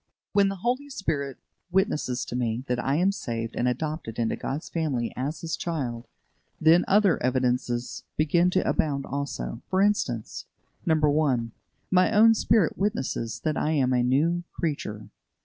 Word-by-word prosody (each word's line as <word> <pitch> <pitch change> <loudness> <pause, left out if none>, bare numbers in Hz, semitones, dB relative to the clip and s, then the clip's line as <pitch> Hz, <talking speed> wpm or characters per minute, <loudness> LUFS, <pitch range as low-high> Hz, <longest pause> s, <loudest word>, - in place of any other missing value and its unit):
When 200 -1 +4
the 195 - -3
Holy 255 +4 0
Spirit 150 - -3 0.3
witnesses 165 -9 0
to - - -6
me 120 0 -1
that 125 -2 -1
I 135 - +1
am 180 +5 +3
saved 115 - -4
and 125 - 0
adopted 130 -2 -3
into 115 -1 0
God's 145 +5 -4
family 140 -8 -2
as 140 +5 -3
His 160 -1 -2
child, 125 -9 -4 0.5
then 165 +3 +5
other 200 -3 +4
evidences 125 -1 -1
begin 170 +4 +3
to 185 +1 +1
abound 140 -3 0
also. 135 - -4
For 185 - +1
instance: 190 - 0 0.4
1. 150 -7 +2 0.4
My 185 +2 +4
own 225 +1 +7
spirit 215 -5 +2
witnesses 190 - -2
that 155 -1 -1
I 155 - +1
am 130 -4 +2
a 125 - +3
new 150 +8 +2
creature. 110 -10 -4
150 Hz, 150 wpm, -26 LUFS, 125-175 Hz, 0.5 s, own